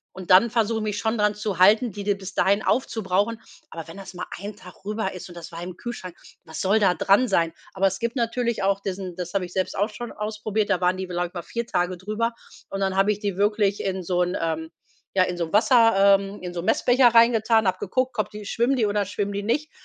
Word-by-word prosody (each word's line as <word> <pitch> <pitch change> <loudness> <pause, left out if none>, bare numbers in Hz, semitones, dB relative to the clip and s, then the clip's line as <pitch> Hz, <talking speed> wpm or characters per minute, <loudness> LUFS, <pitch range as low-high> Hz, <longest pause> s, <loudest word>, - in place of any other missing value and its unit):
und 185 -2 -9
dann 210 +5 +6
versuche 225 -1 +1
ich - - -3
mich 210 -1 -2
schon 220 0 -1
daran 210 0 +2
zu 210 -3 -3
halten, 215 +5 +5
die 200 +1 -7
die 205 0 +2
bis 190 -1 -9
dahin 200 +3 +3
aufzubrauchen. 220 -2 0 0.3
Aber 165 0 -7
wenn 165 - -10
das 195 -1 -9
mal 180 - -6
1 205 +1 -7
Tag 185 -1 -15
rüber 210 -2 -2
ist 185 - -8
und 175 - -12
das 170 +1 -9
war 170 +1 -7
im 180 0 -7
Kühlschrank, 185 -7 -7 0.3
was 160 - -6
soll 200 +3 +3
da 190 -3 +4
dran 205 +8 +3
sein? 165 -5 +1 0.2
Aber 195 0 +2
es 190 - -2
gibt 235 +2 -2
natürlich 235 -1 -1
auch 195 0 +2
diesen 185 -2 -5
das 180 0 -6
habe 190 -2 0
ich 175 - -12
selbst 185 -1 -1
auch 205 +3 +1
schon 240 +2 -7
ausprobiert, 215 0 -2
da 185 - +2
waren 180 +1 +2
die, 185 -1 -4
glaube 175 0 -2
ich, - - -33
mal 175 - -4
4 235 0 -4
Tage 180 -3 -1
drüber. 215 +5 -2 0.4
Und 195 - -4
dann 190 -1 0
habe 195 +2 +3
ich 205 - -3
die 200 -3 -2
wirklich 205 -1 +1
in 190 -1 -2
so 180 +1 0
'n 180 +1 0
ähm, 160 -1 -2 0.5
ja, 185 - +5
in 180 -1 -2
so 170 - -1
'n - - -15
Wasser 215 -3 +5
ähm, 200 +1 -7
in 180 - -5
so 175 - -4
'n - - -8
Messbecher 250 0 +4
reingetan, 225 -1 +5
habe 185 0 0
geguckt, 255 +6 -1
ob 215 - 0
die 210 -1 -9
schwimmen 240 +5 +1
die 230 -4 +1
oder 205 -1 0
schwimmen 205 0 -3
die 200 0 -3
nicht. 300 +8 -1
200 Hz, 255 wpm, -24 LUFS, 185-220 Hz, 0.5 s, dann